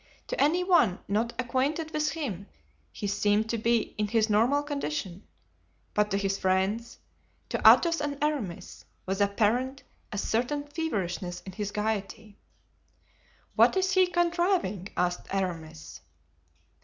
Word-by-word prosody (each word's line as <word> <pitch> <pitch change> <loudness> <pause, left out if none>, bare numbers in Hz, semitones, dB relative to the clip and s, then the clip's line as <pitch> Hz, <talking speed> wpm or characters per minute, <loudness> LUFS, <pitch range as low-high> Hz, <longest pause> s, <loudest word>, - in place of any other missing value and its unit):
To - - -1
any 340 +5 +3
one 295 - +4
not 220 +4 0
acquainted 275 +6 -1
with 305 -1 0
him 220 - -4 0.4
he 205 - -6
seemed 205 +2 +1
to 230 - -1
be 230 0 +1
in 210 - +1
his 220 0 +1
normal 245 +8 +3
condition; 190 - -4 0.7
but 210 0 +2
to 195 - 0
his 195 0 -1
friends—to 190 +6 -3
Athos 335 -3 +6
and 290 -1 -2
Aramis—was 200 - -4
apparent 230 +7 +1 0.3
a 205 - -4
certain 245 +8 -1
feverishness 195 - -3
in 190 - -9
his 205 +2 -4
gayety. 210 0 -4 1.2
"What - - +5
is 375 0 +1
he 370 0 +4
contriving?" 345 - 0
asked 180 0 -1
Aramis. 160 - -4
220 Hz, 125 wpm, -28 LUFS, 195-290 Hz, 1.2 s, Athos